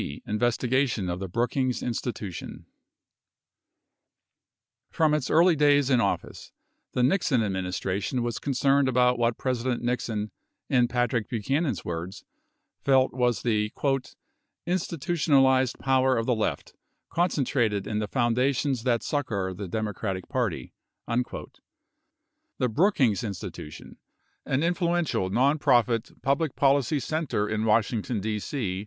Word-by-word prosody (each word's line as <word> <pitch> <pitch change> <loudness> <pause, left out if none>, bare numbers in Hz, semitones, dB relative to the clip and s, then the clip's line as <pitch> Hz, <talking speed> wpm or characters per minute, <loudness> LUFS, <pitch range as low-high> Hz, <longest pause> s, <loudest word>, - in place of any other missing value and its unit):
C. 70 - -6
Investigation 120 -2 0
of 90 - -4
the 95 - -4
Brookings 125 +5 -1
Institution 115 -6 -5 2.2
From 155 -2 +2
its 150 -4 0
early 170 +2 +5
days 145 -2 +3
in 125 -2 +4
office, - - -3 0.4
the 125 - +1
Nixon 135 - +2
administration 95 +4 -2
was 120 -1 -3
con 140 -2 -3
cerned 140 +1 +3
about 125 -1 +3
what 115 -1 +1
President 125 -1 -2
Nixon, 115 -3 -2 0.4
in 125 -3 +3
Patrick 120 -2 0
Buchanan's 130 - -1
words, 85 +4 -5 0.6
felt 130 -1 +3
was 125 -2 0
the 105 -3 0 0.5
" - - -52
institutionalized 140 -6 +2
power 130 -1 +2
of 115 - 0
the 125 - +2
left 105 -11 -2 0.4
concentrated 130 - 0
in 105 0 -2
the 105 - -2
foundations 125 +2 +1
that 120 -1 0
succor 105 -10 -2
the 95 +1 -6
Democratic 105 -2 -3
Party." 115 - -2 0.3
24 120 +1 -3 1.1
The 125 - +1
Brookings 130 - +2
In 105 -3 -2
stitution, 75 -3 -9 0.5
an 135 +3 +1
influential 170 - 0
nonprofit 125 -1 +2
public 140 +2 0
policy 140 0 +2
center 140 -7 -1
in 110 +1 -1
Washington, 110 +1 +1
D.C. 105 +1 -3
125 Hz, 120 wpm, -26 LUFS, 110-135 Hz, 2.2 s, early